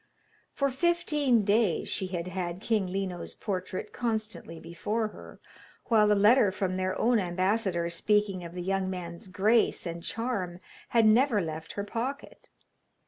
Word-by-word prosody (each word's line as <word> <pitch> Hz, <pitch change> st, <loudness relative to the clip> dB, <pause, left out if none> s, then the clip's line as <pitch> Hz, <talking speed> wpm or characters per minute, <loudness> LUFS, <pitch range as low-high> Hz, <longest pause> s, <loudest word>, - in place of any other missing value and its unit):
For 275 Hz, -1 st, 0 dB
fifteen 290 Hz, -5 st, +2 dB
days 205 Hz, -3 st, +2 dB
she 190 Hz, -, -1 dB
had 175 Hz, -2 st, -4 dB
had 180 Hz, -1 st, -4 dB
King 210 Hz, -2 st, 0 dB
Lino's 185 Hz, -1 st, -4 dB
portrait 185 Hz, -3 st, -4 dB
constantly 220 Hz, -7 st, -3 dB
before 210 Hz, +7 st, -2 dB
her, -, -, -13 dB, 0.5 s
while 215 Hz, -3 st, +5 dB
the 210 Hz, -, +4 dB
letter 210 Hz, +1 st, +5 dB
from 190 Hz, -1 st, -2 dB
their 185 Hz, 0 st, -1 dB
own 240 Hz, -1 st, +3 dB
ambassador 185 Hz, -1 st, 0 dB
speaking 195 Hz, +2 st, +1 dB
of 170 Hz, +1 st, -9 dB
the 180 Hz, -, -4 dB
young 190 Hz, 0 st, 0 dB
man's 180 Hz, +1 st, -6 dB
grace 210 Hz, +5 st, +2 dB
and 170 Hz, 0 st, -5 dB
charm 200 Hz, -4 st, -3 dB, 0.3 s
had 230 Hz, -2 st, +4 dB
never 230 Hz, +1 st, +4 dB
left 160 Hz, -3 st, -5 dB
her 200 Hz, -, -3 dB
pocket. 240 Hz, +7 st, -5 dB
200 Hz, 145 wpm, -29 LUFS, 180-225 Hz, 0.5 s, while